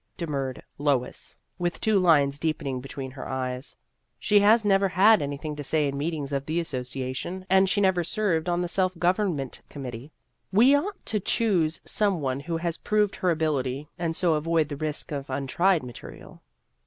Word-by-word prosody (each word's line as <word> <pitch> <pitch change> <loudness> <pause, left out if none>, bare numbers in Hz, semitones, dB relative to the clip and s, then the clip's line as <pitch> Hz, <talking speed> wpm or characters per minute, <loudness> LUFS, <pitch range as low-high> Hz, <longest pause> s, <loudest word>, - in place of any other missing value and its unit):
demurred 140 -6 -3 0.2
Lois, 140 -4 -1 0.2
with 175 0 -2
two 215 -2 +3
lines 145 -6 +3
deepening 145 -5 -2
between 135 0 -7
her 130 - -8
eyes; 130 +1 -3 0.2
" - - -50
she 205 -1 +6
has 215 +2 +5
never 195 -1 +4
had 205 +5 +5
anything 145 +2 -4
to 145 - -6
say 150 +1 +1
in 140 - -3
meetings 145 -1 -3
of 135 -1 -1
the 160 +2 0
Association, 130 +4 -4
and 190 0 +5
she 205 - +1
never 190 -3 +3
served 180 -3 0
on 175 0 +1
the 175 - -1
self 185 0 0
government 175 - 0
committee. 130 0 -7 0.4
We 240 +8 +6
o 285 - +1
ought 405 -2 -9
to 215 - 0
choose 180 -6 +1
some 200 -5 +1
one 135 -2 -2
who 165 +3 -3
has 170 0 -2
proved 210 -1 +1
her 185 - +1
ability, 150 -4 -1
and 165 -2 -1
so 175 -2 +2
avoid 155 0 +1
the 145 - -4
risk 155 +1 -3
of 140 -1 -4
untried 155 +6 +1
material." 120 -2 -11
160 Hz, 180 wpm, -26 LUFS, 140-185 Hz, 0.4 s, she